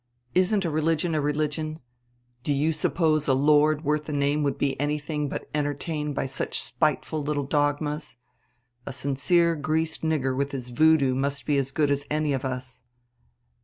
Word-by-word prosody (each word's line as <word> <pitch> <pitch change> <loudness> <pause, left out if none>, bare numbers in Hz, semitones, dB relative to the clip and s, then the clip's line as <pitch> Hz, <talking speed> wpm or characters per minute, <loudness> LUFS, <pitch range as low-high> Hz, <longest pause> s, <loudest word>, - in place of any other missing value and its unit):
Isn't 185 +2 +2
a 165 - -1
religion 160 +2 +1
a 155 - +1
religion? 155 +1 -1 0.6
Do 145 - -2
you 145 +3 +2
suppose 155 -1 +1
a 135 - +4
Lord 150 +2 +4
worth 150 0 0
the 150 - -5
name 145 +1 +1
would 140 -1 0
be 140 -1 +1
anything 150 0 -2
but - - -5
entertained 150 0 -2
by - - -1
such 135 - -1
spiteful 155 - 0
little 145 -1 -1
dogmas. 145 0 -1 0.7
A - - -4
sincere 165 +6 +2
greased 160 +2 -1
nigger 145 -5 0
with 140 +1 -2
his 125 -2 -5
voodoo 150 0 +4
must 140 +2 -2
be 145 - +1
as 135 -1 -1
good 145 0 +1
as 140 0 0
any 150 -1 0
of 135 0 -2
us." 130 -1 -5
150 Hz, 165 wpm, -26 LUFS, 140-155 Hz, 0.7 s, a